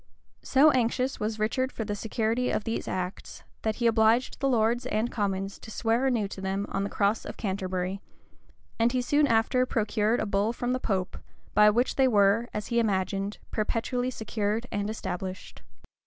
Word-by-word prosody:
So 290 +3 +5
anxious 255 +1 0
was 215 +1 -2
Richard 255 +5 0
for 225 - -4
the 205 - -2
security 225 +3 -1
of - - -1
these 225 - -3
acts, 185 0 -5 0.2
that 220 -1 -1
he 240 - -2
obliged 225 +2 +3
the 275 - +1
lords 240 +1 +1
and 220 +1 -1
commons 195 -2 -2
to - - -11
swear 230 +4 +1
anew 230 -6 +1
to 195 - -8
them 195 +1 -2
on 195 - -1
the 200 - -2
cross 205 +2 +1
of - - -8
Canterbury;[] 190 -1 -3 0.8
and 230 +1 +3
he 255 - +1
soon 290 +3 +3
after 230 +2 +3
procured 220 0 +1
a - - 0
bull 205 +2 0
from 245 +1 -2
the 255 - -1
pope, 190 -6 -2 0.3
by 210 0 +7
which 240 +4 +1
they 265 -1 +5
were, 210 +1 +3
as 210 -1 -5
he 235 - +2
imagined, 195 -1 -1
perpetually 245 +3 -1
secured 220 -1 -2
and 205 0 -2
established. 185 -3 -5
220 Hz, 180 wpm, -27 LUFS, 200-240 Hz, 0.8 s, by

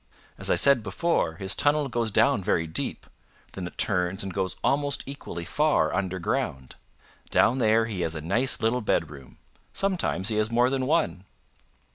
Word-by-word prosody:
As - - -6
I - - +4
said 140 -4 +4
before, 105 - -1
his 95 +3 0
tunnel 145 0 +2
goes 120 -2 -1
down 115 0 +2
very 85 -4 +1
deep; 80 - -2 0.5
then 90 -2 -5
it - - -12
turns 95 0 0
and 95 -1 -5
goes 95 -2 -1
almost 145 0 +1
equally 110 -11 -7
far 150 - +1
underground. 90 -8 -2 0.6
Down 125 +4 +3
there 110 -1 +3
he 105 -5 -4
has 80 -1 -1
a - - -4
nice 125 - 0
little 115 +3 +1
bedroom. 75 -10 -3 0.4
Sometimes 180 - -1
he 110 - -1
has 110 0 +1
more 120 +2 +2
than 130 -1 -1
one." 150 - 0
110 Hz, 165 wpm, -26 LUFS, 90-135 Hz, 0.6 s, I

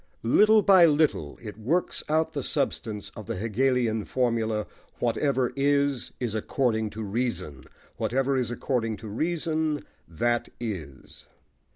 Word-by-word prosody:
Little 210 - +5
by 185 -4 +7
little, 145 - +1
it 105 -1 -8
works 160 +12 0
out 160 +1 +1
the 145 - -2
substance 105 -4 -2
of 110 - -9
the - - -3
Hegelian 115 +1 +1
formula: 115 -4 0 0.3
"Whatever 125 +2 0
is, 140 -2 +1
is 120 -4 -2
according 110 0 0
to 110 - -3
reason: 100 - -3 0.3
whatever 135 +2 0
is 125 -3 0
according 120 -3 -1
to 110 - -9
reason, 155 +4 -1 0.2
that 120 +9 0
is." 85 - -7
120 Hz, 130 wpm, -27 LUFS, 110-140 Hz, 0.3 s, by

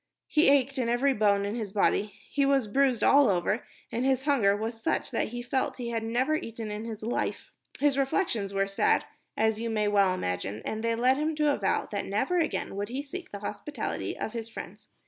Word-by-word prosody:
He 305 -2 +4
ached 275 -1 +3
in 235 -2 0
every 265 +4 +3
bone 205 -3 +2
in 205 - -2
his 220 -4 -4
body, 205 0 +1 0.2
he 285 - +2
was 275 -3 +3
bruised 260 +1 +2
all 280 -3 +6
over, 195 +4 +1 0.3
and 235 - -1
his 265 -1 +2
hunger 230 -9 +3
was 225 +1 -4
such - - -1
that - - 0
he 240 +2 -6
felt 260 +2 -1
he 240 -2 -4
had 230 -1 -1
never 245 +6 +1
eaten 230 -7 -4
in 210 +2 -5
his 220 -2 -6
life. 230 - -2 0.3
His 280 -1 +2
reflections 265 - 0
were 195 0 +1
sad, 195 0 +2 0.3
as 220 0 +2
you 230 0 -2
may 215 -2 +1
well 200 -2 +4
imagine, 95 - -3
and 220 +1 -3
they 230 0 +1
led 255 +3 +3
him 310 +1 0
to 300 -1 +3
a - - -1
vow - - 0
that - - -3
never 360 0 +1
again 320 - -1
would 205 +2 -3
he 265 +4 -3
seek 355 +6 -8
the 200 - -7
hospitality 210 +8 -4
of 220 - -4
his 230 -1 -5
friends. 230 - -9
230 Hz, 220 wpm, -28 LUFS, 210-275 Hz, 0.3 s, all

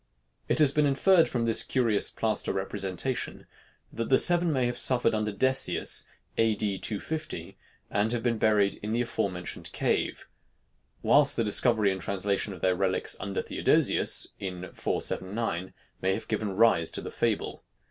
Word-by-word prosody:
It - - +1
has 150 -3 +4
been 150 0 +2
inferred 165 +5 +4
from 120 -2 -1
this 115 -1 +4
curious 115 -5 +1
plaster 110 -2 -2
representation, 95 +5 -3 0.5
that 115 0 -4
the 130 - +5
seven 175 -1 +2
may 130 -4 +1
have 120 0 -2
suffered 120 -3 +2
under 105 -1 -1
Decius, 130 +6 +1 0.3
A. 115 -1 +3
D. 100 -2 -2
250, 155 +9 -5 0.4
and 105 +2 +1
have 120 -2 -2
been 120 -2 0
buried 105 -2 +2
in 105 +1 -3
the 120 - +1
afore 110 -3 -1
mentioned 90 -1 -7
cave; - - -1 0.8
whilst 145 -1 +4
the 115 - +1
discovery 110 -1 +4
and 95 -1 -4
translation 100 +2 -1
of 90 -4 -9
their 95 -1 +2
relics 95 0 +1
under 95 0 -3
Theodosius, - - +2
in 90 -1 -6
479, 95 -2 -2 0.3
may 95 +1 +1
have - - -7
given 105 -3 -2
rise 100 -7 +3
to - - -4
the - - -7
fable. - - -2
110 Hz, 160 wpm, -28 LUFS, 100-120 Hz, 0.8 s, the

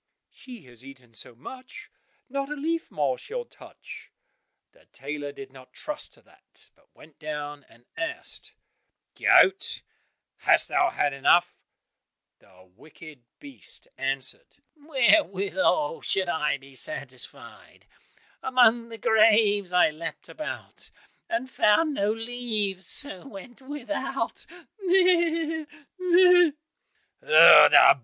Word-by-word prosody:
"She 245 -8 -13
has 125 -1 -13
eaten 130 -3 -15
so 115 +2 -8
much, 255 - -12 0.4
not 275 +1 -4
a 300 - -4
leaf 325 +3 -3
more 140 -4 -2
she'll 480 +2 -6
touch." - - -14 0.6
The - - -27
tailor 145 +1 -7
did 135 -1 -12
not 130 -1 -16
trust 300 0 -5
to - - -23
that, - - -18
but - - -33
went 155 - -19
down 145 -2 -7
and 120 +1 -23
asked, 360 +12 -7 0.6
"Goat, 385 +1 +3 0.5
hast - - +2
thou 360 -1 +2
had 145 -1 -1
enough?" 140 +5 +2 0.8
The 95 -1 -22
wicked 155 +1 -15 0.2
beast 280 -2 -9
answered, 135 0 -5 0.2
"Wherewithal 295 - +1
should 190 -2 -1
I 150 -3 -1
be 135 0 -18
satisfied? 305 - -7 0.6
Among 240 -3 +3
the 225 - -9
graves 215 -3 +3
I 180 -3 +3
leapt 165 +2 -8
about, 310 - -8 0.4
And 335 -6 -2
found 275 +6 +2
no 205 -5 0
leaves, 220 -5 -3
so 275 -4 +1
went 240 +3 -12
without, 290 +1 -5 0.3
meh! 340 -4 +1 0.3
meh!" 360 -2 +5
225 Hz, 110 wpm, -25 LUFS, -, 0.8 s, meh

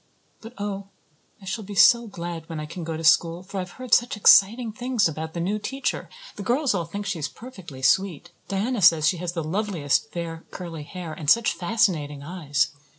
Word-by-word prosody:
But 225 +2 -10
oh, 200 -1 -4 0.6
I - - -11
shall 210 +4 -4
be 205 +1 -8
so 235 +3 +6
glad 170 -4 -6
when 160 -2 -5
I 155 - -4
can 170 +3 -7
go 160 -1 -4
to 165 - -6
school 165 +2 +3
for 195 +1 -6
I've 180 -1 -6
heard 255 -2 -5
such 240 -2 +3
exciting 220 +3 +6
things 245 -2 +1
about 160 +1 -6
the - - -2
new 200 +5 -1
teacher. 270 +5 -3 0.3
The - - -5
girls 250 +6 +1
all 175 -4 -1
think 200 +5 -6
she 190 -4 -2
is 145 -2 -2
perfectly 180 - -11
sweet. 175 +2 +1 0.2
Diana 210 +4 -1
says 165 -3 +6
she 180 - +2
has 175 0 -4
the 165 -2 -3
loveliest 165 -5 -1
fair 165 -1 -5
curly 170 -4 -7
hair 175 -2 -7
and 150 -2 -3
such 230 +5 +4
fascinating 170 -8 0
eyes. 150 -3 -1
180 Hz, 205 wpm, -24 LUFS, 165-210 Hz, 0.6 s, so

